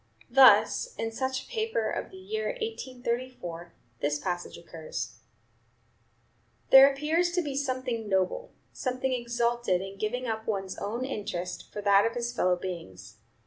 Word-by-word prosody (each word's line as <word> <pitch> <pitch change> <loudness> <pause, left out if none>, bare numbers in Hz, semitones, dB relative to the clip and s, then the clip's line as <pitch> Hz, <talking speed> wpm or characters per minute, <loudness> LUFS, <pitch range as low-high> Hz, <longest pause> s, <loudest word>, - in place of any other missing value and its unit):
Thus, 270 - +6
in 225 0 -2
such 260 +3 -2
a - - -17
paper 455 +1 -1
of - - -3
the 380 - -12
year 435 +6 -3
1834, 250 - -4 0.3
this 145 +1 0
passage 175 +2 -4
occurs: 120 -10 -7 1.5
"There 270 +1 +10
appears 315 +5 +1
to 355 0 +1
be 285 -3 -4
something 255 -5 -2
noble, 190 - 0 0.2
something 255 0 -1
exalted, 235 -4 0
in 195 +1 -8
giving 245 +4 -2
up 220 -1 -3
one's 195 -3 -2
own 230 +5 -3
interest 200 -8 -5
for 210 - -5
that 200 +1 +5
of 230 - -4
his 240 0 -2
fellow 185 -6 +2
beings. 105 - -7
235 Hz, 145 wpm, -28 LUFS, 190-270 Hz, 1.5 s, There